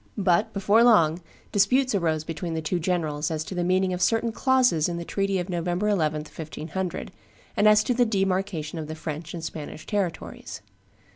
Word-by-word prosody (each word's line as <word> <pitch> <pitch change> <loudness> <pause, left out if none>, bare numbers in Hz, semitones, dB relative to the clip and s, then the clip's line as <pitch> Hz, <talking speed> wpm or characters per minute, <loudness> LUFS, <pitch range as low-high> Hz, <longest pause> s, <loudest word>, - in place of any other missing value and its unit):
But, 200 +2 +2
before 205 +3 +3
long, 175 -8 +4 0.3
disputes 250 +6 +3
arose 160 -5 0
between 165 +1 -4
the 160 - -2
two 175 +3 -1
generals 160 -4 -1
as 155 -1 -2
to 190 - -7
the 175 -1 -1
meaning 185 +1 +1
of 180 - -4
certain 225 +2 +2
clauses 250 - +2
in 170 - -3
the 170 - -5
treaty 195 +1 -1
of 180 -1 -2
November 175 +2 -1
11, 155 -6 +1
1500, 160 +3 -5 0.4
and 210 - +4
as 215 0 +6
to 250 - 0
the 245 +1 +3
demarcation 190 -6 -1
of 155 - -5
the 155 - -6
French 155 +1 -6
and 165 - -6
the - - -3
Spanish 155 0 -7
territories. 200 -5 -4
180 Hz, 190 wpm, -25 LUFS, 160-205 Hz, 0.4 s, as